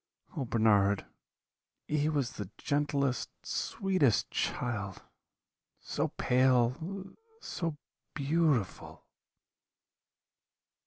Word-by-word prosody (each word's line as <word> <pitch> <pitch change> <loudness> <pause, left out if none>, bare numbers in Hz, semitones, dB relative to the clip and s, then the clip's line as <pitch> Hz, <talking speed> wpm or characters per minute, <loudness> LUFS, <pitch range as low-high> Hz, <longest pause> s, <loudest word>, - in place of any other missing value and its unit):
Oh, 140 - -1
Bernard, 105 -4 +3 0.8
he 150 0 +1
was 140 -5 0
the 100 -3 -6
gentlest, 140 -2 0
sweetest 185 - +1
child 100 -6 -2 0.8
so - - -1
pale! 130 +10 +2 0.2
so 165 - -3 0.4
beautiful!' 145 - 0
135 Hz, 65 wpm, -31 LUFS, 115-155 Hz, 0.8 s, Bernard